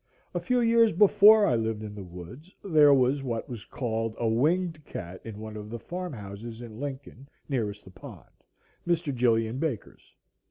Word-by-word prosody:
A - - -1
few 250 -1 +1
years 230 -1 +4
before 210 +3 +7
I 125 - +2
lived 110 -1 -2
in 105 -1 -7
the 105 -2 -8
woods 90 - -11
there 155 -6 +5
was 135 +1 +3
what 120 -4 -3
was 115 -4 -8
called 115 -3 -3
a 115 - -1
"winged 155 +7 +1
cat" 90 -7 -8
in 110 -2 -8
one 110 0 -8
of 105 0 -8
the 120 - -5
farm 180 +10 -6
houses 105 +1 -8
in 115 -2 -10
Lincoln 140 -1 -7 0.2
nearest 105 -7 -3
the 95 - -13
pond, 95 - -12 0.6
Mr. 170 -4 0
Gilian 115 -1 +1
Baker's. 140 -9 -5
120 Hz, 175 wpm, -27 LUFS, 110-155 Hz, 0.6 s, before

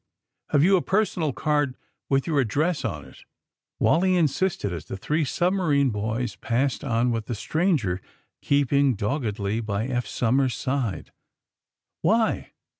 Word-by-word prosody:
*^Have 145 - +4
you 190 +2 +5
a - - 0
personal 190 -6 0
card 145 -1 0 0.3
with 135 -1 +2
your 155 -4 +1
address 145 +8 0
on - - -4
it?" - - -16 0.6
Wally 185 +3 +3
insisted, 165 - 0
as 85 - -6
the - - -6
three 155 +10 0
submarine 155 -4 +1
boys 110 +3 -2
passed 130 +4 -1
on 120 -2 +1
with 115 -2 -3
the 120 - -2
stranger 110 - 0 0.4
keeping 140 -2 +2
dog 115 +9 -1
gedly 105 +1 -2
by 105 0 -2
Eph 125 -1 -2
Somers 130 +2 +1
's - - -7
side, 130 -7 -2 0.9
*'Why?" 220 +6 +1
135 Hz, 145 wpm, -25 LUFS, 115-160 Hz, 0.9 s, you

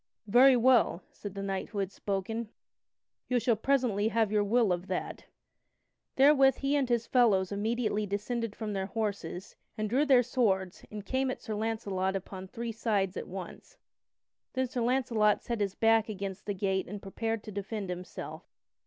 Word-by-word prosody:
"Very 250 +5 +6
well," 240 -6 +4
said 200 -2 -8
that 195 - -4
knight 195 -1 -3
who 210 - -8
had 195 -1 -1
spoken, 210 +4 -3 0.8
"you 250 -1 +2
shall 235 0 +2
presently 225 -4 +1
have 220 -1 +1
your 210 -1 +3
will 215 -1 +3
of 180 +1 -4
that." 185 - -4 0.9
Therewith 270 -1 +6
he 275 +1 0
and 275 -3 +1
his 235 -1 +1
fellows 210 -8 +3
immediately 215 0 -1
descended 210 +2 -3
from 215 -2 -4
their 190 -1 -2
horses, 200 -4 -4 0.2
and 215 0 -1
drew 255 +7 +2
their 255 -3 +6
swords 195 -7 0
and 210 -1 -7
came 265 +3 0
at 255 - -3
Sir 220 - -5
Launcelot 205 -3 -1
upon 190 0 -6
three 230 +4 -5
sides 210 -4 0
at - - -5
once. 185 -1 -9 0.8
Then 260 0 0
Sir 245 0 -3
Launcelot 230 -4 +2
set 235 -2 -3
his 200 -2 -1
back 225 -1 +3
against 195 -1 -5
the 205 - -1
gate 190 0 -1
and 205 +2 -6
prepared 225 +3 -3
to 215 - -8
defend 200 -1 -4
himself. 180 +1 -7
215 Hz, 170 wpm, -30 LUFS, 195-235 Hz, 0.9 s, Very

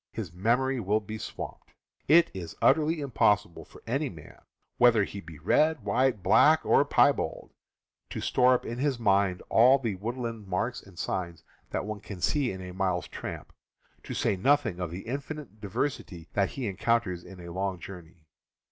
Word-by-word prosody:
His 95 -8 -6
mem 115 +8 +2
ory 130 -1 -1
will 105 0 +1
be 110 +1 -7
swamped! 110 - -8 0.3
It 165 +4 +6
is 85 -4 -7
utterly 155 +2 +3
im 140 -2 -5
possible 105 -6 +2
for - - -17
any 135 +5 -1
man, 80 -4 -13 0.4
whether 120 -3 +6
he 100 0 -6
be 80 -3 -12
red, 150 - +2
white, 120 -1 +1
black, 130 +10 +5
or - - +5
piebald, - - +1 0.6
to - - -5
store 125 0 +4
up - - -3
in 120 +2 -5
his 140 -2 0
mind 100 -5 +2
all 125 +4 +6
the 115 -6 -2
woodland 115 +1 -5
marks 105 +7 -2
and 95 -3 -17
signs 85 -2 -4 0.3
that - - -3
one 105 0 -5
can 100 -2 -9
see 135 - +1
in 95 - -7
a 90 0 -8
mile's 90 -5 -1
tramp, - - -7 0.5
to - - -7
say - - +1
nothing 120 -2 +2
of 90 -2 -3
the 90 +3 -6
infinite 140 -2 -6
diversity 100 - -3
that 100 -1 +1
he 130 -4 -4
encounters 100 -2 0
in 90 0 -12
a 85 -1 -9
long 95 0 -2
journey. 85 -2 -11
105 Hz, 180 wpm, -28 LUFS, 90-125 Hz, 0.6 s, It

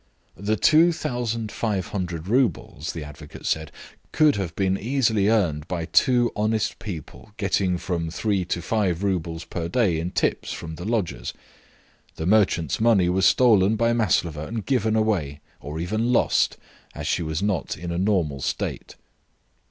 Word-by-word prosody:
"The 105 +3 -1
2,500 115 - 0
roubles," 115 - 0
the 80 - -5
advocate 75 0 -11
said, 80 0 -1 0.4
"could 155 -2 +4
have 95 -4 -3
been 95 -1 +1
easily 110 -2 +1
earned 85 -9 +1
by 85 -3 -3
two 120 - +3
honest 110 0 0
people 100 +1 -8
getting 95 -3 +1
from 85 -2 -3
three 95 +3 0
to 85 -1 -3
five 100 -5 0
roubles 85 -4 -2
per 85 0 -4
day 95 -6 +2
in 85 +2 -2
tips - - -1
from 80 -1 -6
the 90 +3 -7
lodgers. 105 - -2 0.8
The 80 - -4
merchant's 95 -3 +2
money 105 -6 +4
was 95 +1 +3
stolen 110 -4 +4
by 115 +1 +2
Maslova 85 -9 0
and 115 -2 -4
given 110 -5 +1
away, 95 -11 0 0.2
or 75 +2 -6
even 110 +8 0
lost, 125 - +2 0.4
as - - -5
she - - 0
was 80 +2 -2
not 100 -8 -1
in 85 -1 -5
a 85 - -2
normal 90 -9 0
state." - - -3
95 Hz, 150 wpm, -24 LUFS, 85-110 Hz, 0.8 s, could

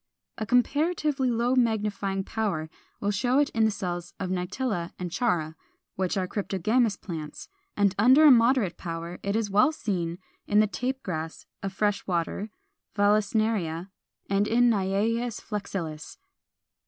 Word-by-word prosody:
A 215 - -3
comparatively 290 +1 +1
low 240 +1 +1
magnifying 210 -5 0
power 190 -8 -2 0.3
will 205 - 0
show 245 +6 +1
it 290 0 +3
in 225 -1 +2
the - - +4
cells 175 -4 -4
of 185 -1 -3
Nitella 185 0 -2
and 180 -2 -5
Chara 170 -9 0 0.4
(which 185 0 -1
are 185 -1 0
cryptogamous 205 +3 0
plants); 155 -5 -7 0.3
and 200 -2 +3
under 260 +8 +7
a 295 - +9
moderate 235 -5 +4
power 170 0 -6
it 200 +1 -2
is 220 -3 -1
well 210 +9 +5
seen 175 - -3 0.3
in 205 - +4
the 215 - +6
Tape 260 +5 -3
Grass 160 -3 -5 0.2
of 195 - -3
fresh 205 +1 -1
water, 180 +4 -2 0.5
Vallisneria, 205 -4 +1 0.4
and 200 +1 +1
in 240 +2 +4
Naias 220 +4 0
flexilis 180 -7 -5
(Fig. - - -48
205 Hz, 145 wpm, -27 LUFS, 180-230 Hz, 0.5 s, a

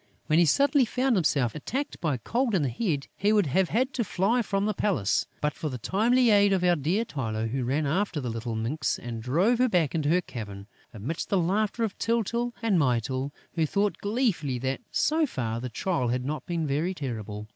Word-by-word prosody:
When 155 +2 +3
he 175 - +6
suddenly 280 - +4
found 255 +2 +1
himself 140 - +1
attacked 265 - -4
by 150 -6 0
Cold 235 - 0
in 170 - +2
the 135 - +1
Head, 145 - -1
he 205 +2 +1
would 210 -3 +4
have 180 +6 +1
had 260 +5 +1
to 245 - 0
fly 215 +5 +1
from 200 -2 -1
the 215 - +1
palace, 140 - 0
but 150 -1 0
for 155 - -4
the 130 - -5
timely 230 - +3
aid 205 -1 +5
of 185 -2 +1
our 175 -1 +4
dear 170 +10 0
Tylô, 115 - -3
who 130 0 -1
ran 140 +5 0
after 175 +3 0
the 125 -4 -3
little 115 0 -4
minx 120 +8 -1
and 115 -2 -6
drove 175 - +2
her 255 0 +4
back 170 -8 +2
to 155 -3 0
her 180 +3 +3
cavern, 100 - -8 0.3
amidst 120 +10 -5
the 200 - +2
laughter 200 +6 0
of 215 -4 -2
Tyltyl 235 +1 0
and 205 -6 +3
Mytyl, 130 +1 0 0.2
who 160 -2 +1
thought 200 +5 0
gleefully 205 - 0
that, 130 +2 -2
so 310 0 +2
far, 115 - -3
the 125 - -4
trial 130 +1 -1
had 125 +1 -1
not 150 +2 -4
been 170 -2 -1
very 155 +6 -1
terrible. 110 - -5
165 Hz, 210 wpm, -27 LUFS, 130-210 Hz, 0.3 s, he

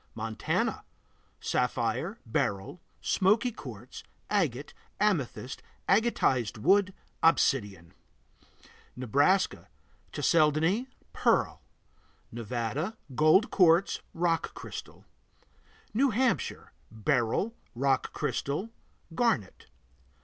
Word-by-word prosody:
Montana 110 0 -2 0.6
Sapphire, 125 - -1
beryl, 100 - -2 0.2
smoky 215 +6 +2
quartz, 230 - -10 0.3
agate, 150 - 0 0.3
amethyst, 145 - -1 0.3
agatized 180 - +2
wood, 190 - +3 0.3
obsidian. 100 - +2 1.0
Nebraska 145 - +1 0.4
Chalcedony, 165 - +2 0.3
pearl. - - +1 0.7
Nevada 120 - -3 0.2
Gold 155 - +4
quartz, 175 0 +4
rock 165 -1 0
crystal. - - -9 0.9
New 265 +5 +3
Hampshire 250 +2 -1 0.2
Beryl, 120 - 0 0.2
rock 135 +1 +1
crystal, 170 +11 -2 0.4
garnet. 165 - 0
155 Hz, 70 wpm, -29 LUFS, 120-195 Hz, 1.0 s, Gold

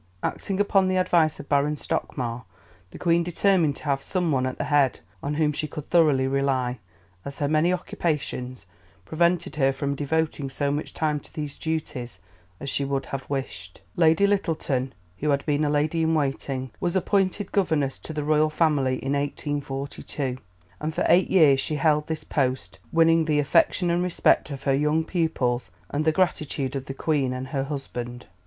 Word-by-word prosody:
Acting 195 -1 -2
upon 195 -2 +3
the 185 0 +1
advice 170 -4 +2
of - - -9
Baron 145 +1 +2
Stockmar, 125 -4 -3 0.5
the - - -10
Queen 170 -1 +2
determined 175 -3 +2
to - - -13
have 140 -2 0
some 180 +1 -1
one 130 -2 +1
at 130 - -4
the - - -2
head 145 -3 +2 0.2
on 145 +1 -2
whom 150 -1 +2
she 150 +1 -3
could 150 0 -8
thoroughly 150 -6 +4
rely, 135 -3 0 0.4
as 140 - -7
her 145 - 0
many 155 +4 +3
occupations 140 - -3 0.4
prevented 170 - +1
her 135 -2 +3
from 140 +1 -2
devoting 145 0 -1
so 140 +1 -1
much 145 +1 -4
time 150 -2 0
to - - -19
these 150 -2 -5
duties 140 - -4 0.4
as 140 - -7
she 140 - -1
could 135 0 -1
have 135 -1 -6
wished. 135 -2 -5 0.2
Lady 165 +3 +4
Lyttelton, 155 -9 0 0.3
who 150 - 0
had 140 -1 +1
been 145 0 +1
a 150 - +1
lady 150 +3 +1
in 160 0 +2
waiting, 135 -3 -2
was 175 -1 -1
appointed 195 +1 +1
governess 155 -8 +1
to - - -9
the 150 -1 -3
Royal 155 +1 +3
Family 150 -5 +2
in 135 - 0
1842, 140 -2 -3 0.4
and 155 +1 -3
for - - 0
eight 175 +3 +5
years 150 -7 +5
she 150 - -2
held 150 +1 +2
this 160 -1 -4
post, 130 -3 -2
winning 165 0 +4
the 155 -1 +1
affection 170 +4 +3
and 175 +1 +1
respect 180 -3 +2
of 140 -2 -7
her 135 - +2
young 150 +3 +2
pupils 130 - -1 0.2
and 150 +2 -1
the 160 - +5
gratitude 150 -5 -1
of 135 -1 -3
the 135 - -5
Queen 140 -4 0
and 130 +1 -5
her 135 -1 -1
husband. 125 -4 -6
150 Hz, 180 wpm, -25 LUFS, 135-160 Hz, 0.5 s, eight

